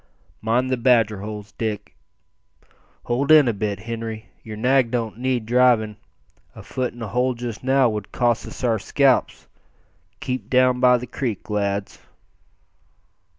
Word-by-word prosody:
Mind 125 +4 0
the 130 - +1
badger 115 -5 +2
holes, 105 0 -7
Dick. 105 -2 -4 1.1
Hold 135 +5 0
in 155 -4 +7
a 120 - +2
bit, 100 -1 -3
Henri; 115 -1 -6
yer 110 -1 -8
nag 125 +2 +2
don't 115 -2 -3
need 125 -3 -1
drivin'; 120 -3 +3 0.6
a - - -11
foot 125 -2 -3
in 120 - -7
a - - -4
hole 125 +4 0
just 120 -1 -6
now 135 0 +3
would 105 -3 -4
cost 120 -2 0
us - - -10
our 115 -3 +1
scalps. 135 +4 +1 0.7
Keep 130 0 -4
down 125 -1 +3
by 125 0 +5
the 125 - -6
creek, 115 -4 -4
lads." 100 -1 -2
120 Hz, 150 wpm, -22 LUFS, 110-125 Hz, 1.1 s, in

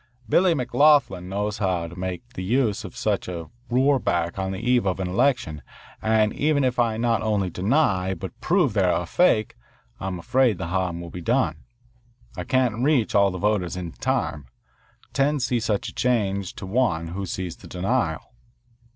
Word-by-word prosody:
Billy 175 - +4
McLoughlin 130 - +3
knows 105 +2 -2
how 90 -4 0
to 85 - -11
make 95 +5 -5
the 110 - -7
best 95 - -5
use 120 -6 +1
of - - -9
such - - -1
a 85 -3 -6 0.2
roorback 120 -10 +1
on 95 0 -2
the 95 - -4
eve 120 -1 +1
of 95 0 -1
an 95 - -1
election, 95 - 0 0.4
and 110 -1 +2
even 145 -1 +1
if 125 -1 0
I 115 -2 +2
not 115 -1 +1
only 105 -4 0
deny 95 - +1
but - - -8
prove - - +2
that - - +2
they - - +3
are - - +1
a - - -7
fake, 110 -1 +2 0.4
I'm 95 -1 -3
afraid 120 +4 +2
the 85 -2 -4
harm 90 -2 -1
will 85 -1 -8
be 90 - -7
done. 80 - 0 0.7
I 90 - -5
can't 125 -1 +1
reach 135 -6 +2
all 100 -1 +5
the 90 - -5
voters 100 -3 0
in 90 -2 -5
time. 75 -3 -2 0.7
Ten 140 +2 +2
see 125 -1 0
such 110 -3 -1
a - - -12
charge 100 -6 0
to - - -7
one 95 -6 0
who 95 +3 -4
sees 90 -1 -4
the - - -13
denial." 90 0 -2
100 Hz, 185 wpm, -24 LUFS, 90-125 Hz, 0.7 s, all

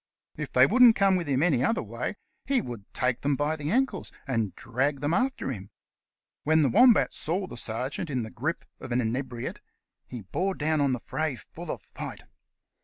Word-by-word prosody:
If - - -5
they - - +6
wouldn't 250 -3 +7
come 195 -2 +4
any 145 -3 +2
other 225 - +1
way, 115 - -4 0.3
he 270 -1 +2
would 120 - -7
take 125 -1 0
them 140 0 +1
by 150 +3 0
the 150 -1 -4
ankles 265 +7 0
and 115 -7 -1
drag 135 +4 -1
them 145 +3 0
after 260 - 0
him. 100 -5 -7 0.7
When 155 +1 +4
the 140 - +3
Wombat 240 +1 +5
saw 185 +5 -2
the - - -9
sergeant 125 +9 -3
in 130 -4 -1
the 110 - -7
grasp 150 +8 -3 0.2
of - - -8
an 120 - +2
inebriate 120 +1 -3 0.5
he 120 -3 -7
bore 185 - -1
down 155 0 +1
on 140 -2 +2
the 125 - -2
fray 155 +1 -2
full - - -10
of - - -4
fight. - - -8
145 Hz, 185 wpm, -27 LUFS, 125-175 Hz, 0.7 s, wouldn't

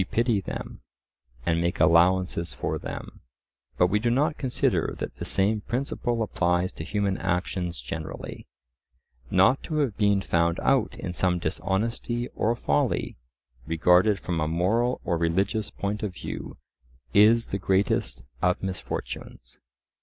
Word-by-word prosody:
We - - 0
pity 115 0 +1
them, - - -7 0.6
and 85 -1 +2
make 85 0 -1
allowances 85 0 +3
for - - -2
them; - - -7 0.6
but - - +5
we 100 +4 +2
do 120 +2 +1
not 150 +6 +2
consider 130 -3 0
that - - -5
the - - -5
same 105 +2 +1
principle 120 -1 -1
applies 90 -3 0
to - - -6
human 100 +2 -1
actions 90 -2 -2
generally. 80 +6 -7 0.8
Not 95 +9 +4
to 155 - -4
have 135 -9 0
been 100 -2 +3
found 85 -2 +1
out 135 -4 +2
in 90 - -4
some 90 0 +1
dishonesty 115 +7 -2
or 115 +2 0
folly, 70 - 0 0.5
regarded 90 +5 +4
from 85 -2 -2
a 75 - 0
moral 105 +10 +1
or 85 -3 0
religious 95 +6 0
point 100 +1 -3
of 100 -4 -3
view, - - -6 0.6
is 115 +3 +5
the 100 - 0
greatest 95 -10 0 0.2
of 90 +1 +1
misfortunes. 95 -1 -6
95 Hz, 140 wpm, -26 LUFS, 85-110 Hz, 0.8 s, but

